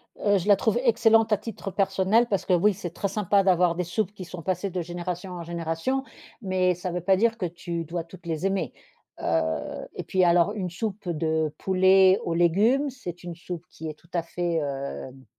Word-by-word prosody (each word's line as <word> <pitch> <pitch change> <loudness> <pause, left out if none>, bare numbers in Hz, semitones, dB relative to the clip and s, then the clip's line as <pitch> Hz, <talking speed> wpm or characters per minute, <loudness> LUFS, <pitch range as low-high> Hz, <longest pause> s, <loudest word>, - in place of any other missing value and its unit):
Heu, 205 -1 +2
je 180 - -5
la 205 - +7
trouve 220 +4 +1
excellente 225 -2 +4
à 210 - +4
titre 210 -2 -6
personnel 195 +4 +2
parce 200 - 0
que 185 - +2
oui, 200 +4 +4
c'est 180 -2 -6
très 200 - -2
sympa 200 0 +2
d'avoir 180 -2 +3
des 180 - -1
soupes 195 +3 -2
qui 190 -3 -8
sont 175 0 -8
passées 185 +4 -1
de 180 0 -2
génération 175 +2 -5
en 175 -1 -6
génération. 170 +10 -2 0.4
Mais 185 -3 +1
ça 180 +1 -4
veut 180 +1 -3
pas 190 +2 +3
dire 230 +3 +2
que 190 - -2
tu 170 0 -4
dois 170 +1 -4
toutes 170 +2 -15
les 165 +1 -2
aimer. 195 0 -2 0.5
Heu, 80 -1 -1
et - - -4
puis 185 -1 +1
alors 175 +3 +4
une 190 -4 -3
soupe 200 +1 -4
de 160 -1 0
poulet 190 0 +5
aux 170 - -1
légumes, 210 - +3
c'est 180 -10 -8
une 175 -1 -6
soupe 175 0 -7
qui 160 - -8
est 155 - -7
tout 170 - -25
à 175 - +1
fait, 175 0 -2
hem, 135 -3 -4
180 Hz, 210 wpm, -26 LUFS, 170-200 Hz, 0.5 s, la